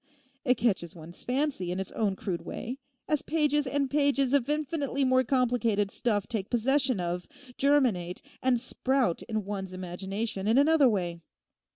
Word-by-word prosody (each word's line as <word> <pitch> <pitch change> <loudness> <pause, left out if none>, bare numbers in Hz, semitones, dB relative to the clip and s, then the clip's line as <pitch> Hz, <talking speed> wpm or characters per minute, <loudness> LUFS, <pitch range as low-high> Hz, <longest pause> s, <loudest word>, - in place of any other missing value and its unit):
It 250 -2 +3
catches 190 -8 0
one's 170 +1 -9
fancy 260 -8 -1
in 180 - -2
its 190 - -4
own 205 -3 0
crude 185 -3 -4
way, 255 +4 -6 0.3
as 300 -2 +1
pages 295 -2 +1
and 280 +1 0
pages 280 -2 +2
of 280 -2 +2
infinitely 295 -2 0
more 255 0 +4
complicated 235 -6 +1
stuff 205 -4 0
take 210 -4 -3
possession 255 0 +3
of, 175 0 -3 0.3
germinate, 245 -12 +1 0.2
and 255 -2 +2
sprout 255 -4 0
in 215 -3 -3
one's 195 -2 -5
imagination 190 +3 -3
in 225 +3 +4
another 290 -1 +5
way. 175 -5 -2
240 Hz, 155 wpm, -28 LUFS, 190-275 Hz, 0.3 s, another